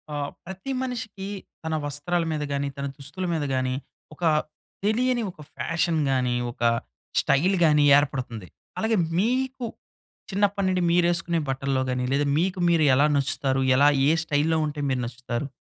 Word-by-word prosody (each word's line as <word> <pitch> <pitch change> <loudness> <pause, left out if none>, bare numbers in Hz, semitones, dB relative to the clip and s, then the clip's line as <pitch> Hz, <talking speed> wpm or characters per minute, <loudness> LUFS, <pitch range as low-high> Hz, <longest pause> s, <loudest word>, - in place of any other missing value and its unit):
ఆహ్, 145 -1 -2 0.2
ప్రతి 190 +8 -6
మనిషికి 225 -6 -5 0.4
తన 160 0 -1
వస్త్రాల 145 +5 -1
మీద 155 -1 -2
గాని, 140 0 -1
తన 140 - -3
దుస్తుల 145 +7 -4
మీద 160 -2 -1
గానీ, 130 0 0 0.4
ఒక 165 - -11 0.6
తెలియని 240 +3 +2
ఒక 175 - -29 0.2
ఫ్యాషన్ 165 -1 0
గాని, 125 -2 +1 0.2
ఒక 120 - -18 0.6
స్టైల్ 180 +8 +3
గాని 150 -2 +4
ఏర్పడుతుంది. 130 -8 -2 0.3
అలాగే, 220 0 +1 0.2
మీకు 255 +4 0 0.7
చిన్నప్పడి 200 0 +1
నుండి, 185 -1 +1
మీరేసుకునే 170 -1 +2
బట్టల్లో 135 0 0
గాని, 125 0 -1
లేదా 145 +1 +2
మీకు, 185 +3 0
మీరు 165 -2 +4
ఎలా 140 +3 +4
నచ్చుతారు? 135 -1 0
ఎలా 140 +2 +6 0.2
ఏ - - +5
స్టైల్‌లో 160 +1 +1
ఉంటే 150 0 -4
మీరు 130 -1 0
నచ్చుతారు? 120 +2 -4
155 Hz, 145 wpm, -25 LUFS, 140-190 Hz, 0.7 s, ఎలా